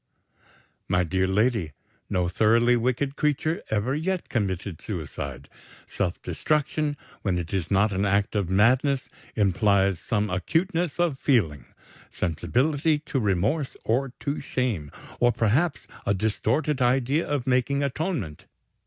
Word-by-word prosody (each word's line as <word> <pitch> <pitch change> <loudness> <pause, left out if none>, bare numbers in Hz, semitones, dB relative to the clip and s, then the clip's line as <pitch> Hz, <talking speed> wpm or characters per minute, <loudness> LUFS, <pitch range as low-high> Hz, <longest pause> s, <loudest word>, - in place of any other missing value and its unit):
"My 90 0 +2
dear 95 +2 0
lady, 105 - +1 0.4
no 90 -1 +1
thoroughly 115 +6 +4
wicked 130 +4 0
creature 150 +2 0
ever 110 +5 0
yet 175 +5 -2
committed 95 -6 -2
suicide. 70 - -6 0.4
Self 90 -3 -2
destruction, 150 - 0 0.2
when 95 -3 0
it 85 0 -4
is 90 -5 -1
not 105 +2 +3
an 95 0 0
act 100 0 +1
of 100 -4 0
madness, 130 +8 +3 0.3
implies 100 -2 +2
some 105 0 -1
acuteness 165 - 0
of 165 -6 +1
feeling 80 - +1 0.4
sensibility 145 - +1
to 145 -2 -3
remorse 105 - 0
or 130 +4 0
to 145 0 -2
shame, 110 - -2 0.3
or 120 0 +4
perhaps 130 +10 +1 0.2
a 100 - +1
distorted 125 +8 0
idea 130 +5 +2
of 145 -4 -1
making 130 +2 +1
atonement. 140 - -3
115 Hz, 125 wpm, -26 LUFS, 95-140 Hz, 0.4 s, thoroughly